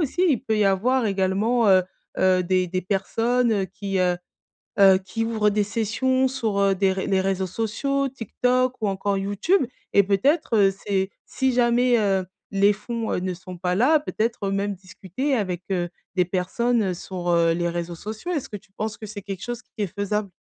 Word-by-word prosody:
aussi 325 Hz, +4 st, 0 dB
il 270 Hz, -8 st, +2 dB
peut 220 Hz, -4 st, 0 dB
y 210 Hz, -, +3 dB
avoir 225 Hz, +6 st, +2 dB
également, 200 Hz, +4 st, +1 dB
heu, 185 Hz, -1 st, +6 dB, 0.4 s
heu, 185 Hz, -1 st, +3 dB
des 185 Hz, 0 st, +1 dB
des 185 Hz, +1 st, -2 dB
personnes 225 Hz, +2 st, +1 dB
qui, 195 Hz, 0 st, -3 dB
heu, 180 Hz, -1 st, +2 dB, 0.6 s
heu, 190 Hz, -1 st, +7 dB
qui 195 Hz, +4 st, -4 dB
ouvrent 220 Hz, -2 st, +1 dB
des 210 Hz, 0 st, +1 dB
sessions 230 Hz, +5 st, 0 dB
sur, 230 Hz, -6 st, -1 dB
heu, 195 Hz, -1 st, +3 dB
des 190 Hz, 0 st, +2 dB
ré 190 Hz, 0 st, -3 dB
les 190 Hz, -1 st, +2 dB
réseaux 190 Hz, 0 st, 0 dB
sociaux 270 Hz, +8 st, -1 dB
TikTok 250 Hz, +1 st, 0 dB
ou 215 Hz, -, 0 dB
encore 195 Hz, +1 st, -1 dB
YouTube 205 Hz, -, +1 dB, 0.3 s
et 200 Hz, -, +6 dB
peut-être, 225 Hz, -, +1 dB
heu, 195 Hz, -2 st, +5 dB, 0.2 s
c'est, 190 Hz, -1 st, 0 dB, 0.2 s
si 265 Hz, -1 st, 0 dB
jamais, 245 Hz, 0 st, +3 dB
heu, 195 Hz, -3 st, +1 dB, 0.3 s
les 200 Hz, +1 st, +4 dB
fonds, 225 Hz, +2 st, -4 dB
heu, -, -, 0 dB
ne 185 Hz, 0 st, -2 dB
sont 185 Hz, 0 st, -10 dB
pas 180 Hz, 0 st, 0 dB
là 295 Hz, +9 st, +4 dB
peut-être 225 Hz, -7 st, -2 dB
même 200 Hz, +1 st, -1 dB
discuter 190 Hz, -, -4 dB
avec, 185 Hz, -4 st, -2 dB
heu, 175 Hz, -2 st, 0 dB, 0.3 s
des 180 Hz, -, +4 dB
personnes, 215 Hz, +6 st, 0 dB
heu, 185 Hz, -2 st, -1 dB
sur, 180 Hz, 0 st, -6 dB
heu, 170 Hz, -1 st, +3 dB
les 175 Hz, +1 st, -1 dB
réseaux 170 Hz, 0 st, -4 dB
sociaux. 220 Hz, -, -6 dB
Est-ce 295 Hz, -6 st, -2 dB
que 210 Hz, -, -6 dB
tu 195 Hz, -, -16 dB
penses 215 Hz, +1 st, -4 dB
que 215 Hz, -, -7 dB
c'est 205 Hz, -1 st, -8 dB
quelque 195 Hz, -2 st, -6 dB
chose 240 Hz, 0 st, -5 dB
qui -, -, -46 dB
est -, -, -2 dB
faisable? 205 Hz, +2 st, -2 dB
200 Hz, 195 wpm, -24 LUFS, 190-235 Hz, 0.6 s, heu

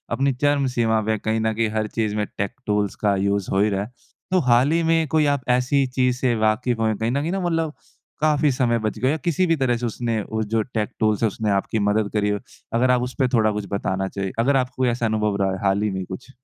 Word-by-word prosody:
अपनी 135 Hz, 0 st, +1 dB
चरम 140 Hz, +1 st, +1 dB
सीमा 110 Hz, -2 st, +2 dB
पे 110 Hz, +1 st, -1 dB
है, 110 Hz, -, 0 dB
कहीं 110 Hz, +1 st, -1 dB
न 110 Hz, 0 st, 0 dB
कहीं 110 Hz, 0 st, 0 dB
हर 110 Hz, 0 st, 0 dB
चीज़ 110 Hz, -2 st, 0 dB
में 105 Hz, 0 st, 0 dB
टेक 100 Hz, 0 st, -1 dB, 0.2 s
टूल्स 105 Hz, -1 st, 0 dB
का 100 Hz, -, +3 dB
यूज़ 100 Hz, -1 st, 0 dB
हो 95 Hz, -, +2 dB
ही 105 Hz, -, +3 dB
रहा 100 Hz, -, -1 dB
है। 105 Hz, -, -10 dB, 0.4 s
तो 185 Hz, -, +4 dB
हाल 125 Hz, +5 st, +4 dB
ही 170 Hz, +1 st, +2 dB
में 165 Hz, -1 st, +3 dB
कोई 155 Hz, -1 st, +4 dB
आप 130 Hz, -, -7 dB
ऐसी 135 Hz, +2 st, +1 dB
चीज़ 125 Hz, -1 st, +2 dB
से 130 Hz, -1 st, +1 dB
वाक़िफ़ 110 Hz, +3 st, +1 dB
हो 110 Hz, -1 st, +2 dB
कहीं 110 Hz, +3 st, -1 dB
न 140 Hz, -, 0 dB
कहीं 165 Hz, +4 st, -2 dB
न 195 Hz, -, -1 dB
मतलब 165 Hz, -3 st, 0 dB, 0.5 s
काफ़ी 150 Hz, -1 st, +3 dB
समय 120 Hz, -2 st, +1 dB
बच 110 Hz, -, -2 dB
गया 130 Hz, +2 st, +2 dB
हो, 160 Hz, -, 0 dB
किसी 175 Hz, +2 st, +2 dB
भी 165 Hz, -, +3 dB
तरह 125 Hz, -3 st, +1 dB
से 120 Hz, -, -3 dB
उसने 115 Hz, -1 st, -2 dB
वो 110 Hz, -, -1 dB
जो 115 Hz, -, +3 dB, 0.2 s
टेक 105 Hz, 0 st, 0 dB
टूल्स 110 Hz, -1 st, +1 dB
है -, -, +5 dB
उसने 105 Hz, 0 st, -2 dB
आपकी 110 Hz, -, -3 dB
मदद 105 Hz, 0 st, +1 dB
करी 105 Hz, -1 st, +1 dB
हो? 105 Hz, 0 st, -1 dB, 0.4 s
अगर 125 Hz, +2 st, +3 dB
आप 125 Hz, -1 st, +3 dB
उसपे 130 Hz, +1 st, 0 dB
थोड़ा 110 Hz, -2 st, +3 dB
कुछ 105 Hz, -, -6 dB
बताना 95 Hz, -1 st, -1 dB
चाहें 95 Hz, -1 st, -2 dB
अगर 135 Hz, +4 st, +3 dB
आपको 130 Hz, +1 st, -5 dB
कोई 125 Hz, -, +3 dB
ऐसा 120 Hz, 0 st, -1 dB
अनुभव 105 Hz, -2 st, 0 dB
रहा 95 Hz, -, +1 dB
है 95 Hz, -, -3 dB
हाल 100 Hz, +1 st, +2 dB
ही 105 Hz, -, +1 dB
में 95 Hz, -, -4 dB
कुछ? 110 Hz, +9 st, -9 dB
115 Hz, 265 wpm, -22 LUFS, 105-130 Hz, 0.5 s, है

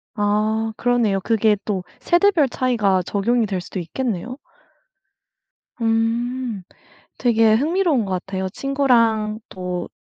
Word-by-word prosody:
아 215 Hz, +1 st, 0 dB
그러네요. 235 Hz, -5 st, +1 dB
그게 220 Hz, 0 st, +2 dB
또 195 Hz, -4 st, -2 dB, 0.2 s
세대별 345 Hz, -4 st, +3 dB
차이가 220 Hz, -8 st, +1 dB
적용이 225 Hz, +6 st, 0 dB
될 190 Hz, -3 st, -3 dB
수도 185 Hz, -, -6 dB
있겠네요. 230 Hz, +5 st, -4 dB, 1.4 s
음. 230 Hz, 0 st, -1 dB, 0.6 s
되게 225 Hz, -3 st, +4 dB
흥미로운 310 Hz, -, +1 dB
것 190 Hz, -, -4 dB
같아요. 190 Hz, +1 st, -3 dB
친구랑 230 Hz, -5 st, +1 dB
또 180 Hz, -1 st, -5 dB
225 Hz, 235 characters per minute, -21 LUFS, 200-245 Hz, 1.4 s, 되게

